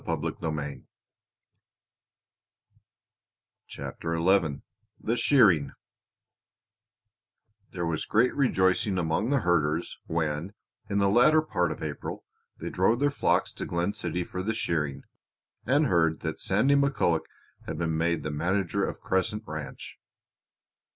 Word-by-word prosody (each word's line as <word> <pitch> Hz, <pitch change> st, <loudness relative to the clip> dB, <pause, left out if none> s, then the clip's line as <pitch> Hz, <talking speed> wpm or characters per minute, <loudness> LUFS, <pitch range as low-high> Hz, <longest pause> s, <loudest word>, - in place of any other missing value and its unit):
CHAPTER 85 Hz, 0 st, -5 dB
XI 85 Hz, -4 st, +2 dB, 0.4 s
THE 115 Hz, -, -1 dB
SHEARING 100 Hz, -, +4 dB, 2.0 s
There 85 Hz, -, -3 dB
was 80 Hz, -1 st, -2 dB
great 120 Hz, +4 st, +2 dB
rejoicing 95 Hz, -6 st, +2 dB
among 90 Hz, +6 st, 0 dB
the 140 Hz, -2 st, +2 dB
herders 85 Hz, -3 st, 0 dB
when, 80 Hz, +3 st, -2 dB, 0.4 s
in 100 Hz, -, 0 dB
the 100 Hz, -1 st, +3 dB
latter 135 Hz, +10 st, +5 dB
part 90 Hz, -, 0 dB
of -, -, -6 dB
April, 75 Hz, -2 st, -5 dB, 0.4 s
they -, -, -5 dB
drove 105 Hz, +6 st, +2 dB
their 145 Hz, +1 st, +2 dB
flocks 140 Hz, -, +1 dB
to -, -, -5 dB
Glen 85 Hz, +3 st, -1 dB
City 90 Hz, -3 st, -2 dB
for 90 Hz, +1 st, -5 dB
the 110 Hz, +3 st, -2 dB
shearing, 75 Hz, -9 st, -2 dB, 0.6 s
and 145 Hz, +4 st, +4 dB
heard 80 Hz, -, +2 dB
that 80 Hz, -1 st, -4 dB
Sandy 110 Hz, +9 st, +3 dB
McCulloch 140 Hz, -, +2 dB, 0.4 s
had 80 Hz, -, -4 dB
been 80 Hz, -1 st, -1 dB
made 85 Hz, +1 st, 0 dB
manager 85 Hz, +5 st, 0 dB
of -, -, -3 dB
Crescent 105 Hz, +3 st, -1 dB
Ranch. 75 Hz, -4 st, -7 dB
90 Hz, 115 wpm, -27 LUFS, 80-110 Hz, 2.0 s, latter